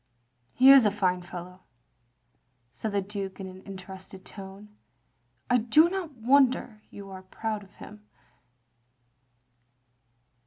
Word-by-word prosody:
" 120 -1 -46
He 260 +2 +7
is 270 -5 +8
a - - +4
fine 185 -3 0
fellow, 180 +1 -10 0.6
" 120 0 -45
said 220 - -4
the 200 -1 0
Duke 195 -1 -6
in 190 -1 -8
interested 190 0 -11
tones. 195 +1 -11 0.4
" 120 0 -45
I 245 - +5
do 305 +10 +4
not 360 -7 -4
wonder 250 -2 +2
you 200 -1 -11
are 190 -1 -9
proud 215 +3 -5
of 200 -1 -17
him. 210 0 -13
195 Hz, 130 wpm, -27 LUFS, 185-220 Hz, 0.6 s, is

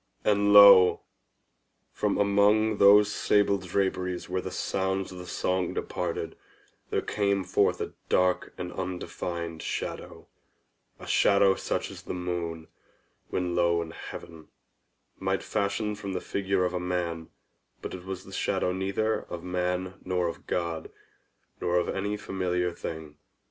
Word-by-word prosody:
And 100 -1 +3
lo! 100 -3 +9 0.9
from - - 0
among 105 +2 +3
those 105 +1 +7
sable 100 -1 +2
draperies 90 -1 -2
where 90 +1 -2
the - - -5
sounds 95 0 -2
of 90 - -9
the 90 - -9
song 90 -1 -1
departed, 85 -2 -3 0.5
there - - 0
came 100 -2 0
forth 90 - +1
a - - -4 0.2
dark 90 0 +2
and 90 -1 -5
undefined 85 -2 -4
shadow—a - - -8
shadow 100 -1 +4
such - - -3
as - - -10
the - - -5
moon, 85 -2 -4 0.6
when 90 -1 -1
low 85 -1 +2
in 80 - -9
heaven, 80 -1 -10 0.7
might 95 0 -1
fashion 105 +1 -1
from 100 -2 -6
the 90 - -1
figure 95 -1 -1
of 90 - -2
a 90 - -1
man: 85 -2 -3 0.5
but - - -5
it 90 -1 -7
was 95 -1 -6
the - - -13
shadow 90 - 0
neither 100 +4 -1
of 85 - -6
man 90 +1 -2
nor 90 -1 0
of 85 - -7
God, 85 -2 -2 0.7
nor 90 0 +1
of 90 - +1
any 100 +2 -2
familiar 90 -3 -1
thing. 80 -3 -7
90 Hz, 140 wpm, -28 LUFS, 90-100 Hz, 0.9 s, lo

